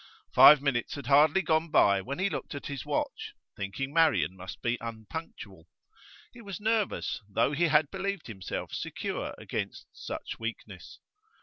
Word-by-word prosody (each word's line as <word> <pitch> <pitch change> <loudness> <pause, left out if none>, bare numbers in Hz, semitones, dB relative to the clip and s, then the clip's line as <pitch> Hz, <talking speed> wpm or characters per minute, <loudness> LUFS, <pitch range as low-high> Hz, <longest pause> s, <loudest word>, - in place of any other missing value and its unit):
Five 145 -1 +9
minutes 125 -5 -1
had 140 - -7
hardly 150 +7 +5
gone 160 0 +1
by 100 -9 +4
when 135 +8 -5
he 185 - +1
looked 195 - -5
at 140 - -7
his 140 -3 -6
watch, - - -3 0.2
thinking 115 +8 -4
Marian 160 - +3
must 90 0 -9
be 120 0 0
unpunctual. 110 - -8 0.7
He 240 - -12
was 200 -3 -7
nervous, 215 - -1
though 100 - +1
he 165 +4 +2
had 150 -2 +3
believed 195 -2 -3
himself 95 -5 -6
secure - - -4
against - - -5
such - - -7
weakness. 110 -5 -7
140 Hz, 150 wpm, -29 LUFS, 110-165 Hz, 0.7 s, Five